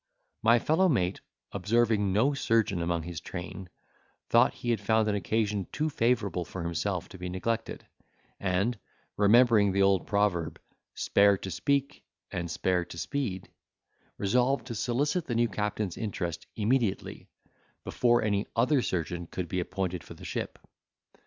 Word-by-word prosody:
My 115 - +5
fellow 160 +9 +3
mate, 95 - 0 0.3
observing 110 -2 +2
no 120 +9 +3
surgeon 115 -8 +1
among 85 -1 -1
his 85 -1 -6
train, 90 +1 -7 0.6
thought - - +5
he 120 - -2
had 110 -4 0
found 110 +1 +2
an 105 - +1
occasion 105 0 -1
too 155 +1 -1
favourable 115 -8 +1
for 90 +1 -7
himself 85 +2 -2
to 95 - -11
be 90 0 -4
neglected; 115 +5 -3 0.5
and, 100 +5 0 0.4
remembering 105 -1 +5
the 100 +1 +3
old 95 -2 +2
proverb, 100 -6 0 0.4
"Spare 100 0 +4
to 95 - -6
speak, 140 - -1 0.3
and 85 -1 -3
spare 90 +2 0
to 85 - -10
speed," 105 -5 -3 0.7
resolved 125 +4 +1
to 120 - -5
solicit 140 - 0
the 120 - -2
new 120 +1 +3
captain's 105 -2 -3
interest 90 -6 -4
immediately, 110 -1 -1 0.6
before 120 -1 +2
any 100 -1 0
other 130 +4 +3
surgeon 85 -3 -3
could 90 0 -4
be 90 - -2
appointed 90 -1 -3
for - - -11
the - - -12
ship. - - -4
105 Hz, 145 wpm, -29 LUFS, 90-120 Hz, 0.7 s, My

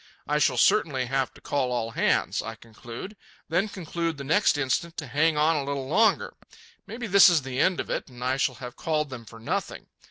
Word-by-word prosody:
I 150 0 +1
shall 135 -3 +2
certainly 135 - +3
have 135 +1 -1
to - - -16
call 135 -3 -1
all 115 -2 -2
hands, - - +1
I 115 - -6
conclude; 115 - -10 0.3
then 180 +6 +1
conclude 170 -4 -3
the 140 - -6
next 160 +3 +3
instant 145 +5 -1
to 155 - -4
hang 150 +4 +1
on 155 +2 +3
a 145 - -1
little 140 -1 -3
longer. 215 +9 +2 0.5
Maybe 235 +2 -6
this 200 -2 +7
is 165 -5 +2
the 130 0 -4
end 185 -2 +2
of - - -4
it, - - -2
and 125 -1 -10
I 130 +1 0
shall 135 -1 0
have 125 +1 -9
called 150 -3 -1
them 120 -3 -8
for 115 +1 -13
nothing. 180 - -3
145 Hz, 215 wpm, -26 LUFS, 125-165 Hz, 0.5 s, this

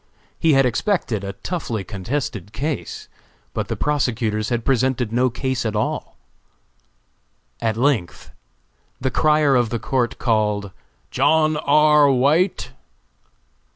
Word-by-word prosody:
He 160 -2 +3
had 135 -1 +4
expected 125 - -1
a 100 0 -5
toughly 120 - -4
contested 105 0 -4
case, 145 +3 -4 0.5
but - - -3
the - - -3
prosecutors 115 -7 -1
had 120 -2 -2
presented 130 -3 +1
no 125 +2 +2
case 130 +1 -2
at 110 -2 -2
all. 105 - -3 1.4
At 110 -1 0
length, 120 - -1 0.7
the 130 0 -1
crier 150 -3 +3
of 120 -3 +2
the 120 - -2
court 120 0 -1
called 105 -4 0 0.4
"John 155 +3 +3
R. 150 0 +4
White." 145 +8 +2
125 Hz, 120 wpm, -21 LUFS, 110-145 Hz, 1.4 s, had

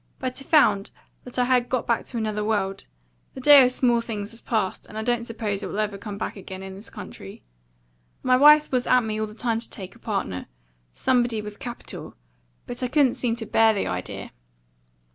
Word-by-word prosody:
"But 255 +1 -4
I - - -11
found 215 - +4 0.4
that 250 - -6
I 250 - +4
had 245 -1 +2
got 255 -2 -1
back 235 - 0
to 245 - -5
another 215 -2 -1
world. 200 -3 -1 0.5
The - - -7
day 285 +1 +9
of 250 - +3
small 240 -2 +2
things 210 -3 -5
was 230 - -11
past, 215 -5 -2
and 215 - -9
I 220 - -2
don't 240 0 0
suppose 215 -3 -3
it - - -4
will - - -5
ever 210 -2 -1
come 205 -1 -6
again 190 -3 -6
in 190 0 -7
this 195 +3 -9
country. - - -10 0.8
My 255 0 +4
wife 300 +3 +7
was 250 -1 0
at 250 - +5
me 215 -1 -2
all 215 - -1
the 215 - -12
time 230 -1 -1
to 230 - -11
take 190 -3 -8
a 235 - -19
partner 195 - -3 0.4
somebody 240 - +1
with 210 0 -8
capital; 240 -3 -8 0.5
but 245 +1 -6
I 250 - 0
couldn't 265 -1 +3
seem 235 -2 -1
to 230 -1 -6
bear 225 0 +4
the 200 - -1
idea. 90 0 -5
230 Hz, 210 wpm, -24 LUFS, 210-250 Hz, 0.8 s, day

